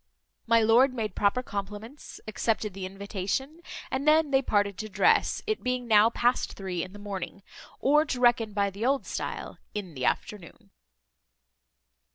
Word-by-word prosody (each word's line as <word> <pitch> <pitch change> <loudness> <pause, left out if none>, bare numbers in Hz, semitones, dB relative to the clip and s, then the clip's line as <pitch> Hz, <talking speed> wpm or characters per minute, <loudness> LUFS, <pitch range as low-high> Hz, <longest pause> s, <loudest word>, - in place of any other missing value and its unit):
My 230 0 +5
lord 250 +4 +5
made 215 -5 -3
proper 210 +5 +1
compliments, 210 +6 -7
accepted 215 -1 -1
the 190 -1 -5
invitation, 200 - -4 0.3
and 270 +3 -2
then 310 -1 +4
they 270 0 +4
parted 205 -5 +1
to 215 - -5
dress, - - +2
it 435 -1 -1
being 250 -1 -2
now 215 0 +6
past 245 +1 0
three 185 -3 -4
in 185 - -8
the - - -10
morning, 200 -1 -6 0.4
or 300 +3 +4
to 260 -5 -3
reckon 240 -3 +3
by 200 -1 +1
the 200 +3 -6
old 270 +2 +1
style, - - -5 0.2
in 195 -5 -5
the 130 -3 -3
afternoon. 200 +1 -3
215 Hz, 160 wpm, -28 LUFS, 200-255 Hz, 0.4 s, now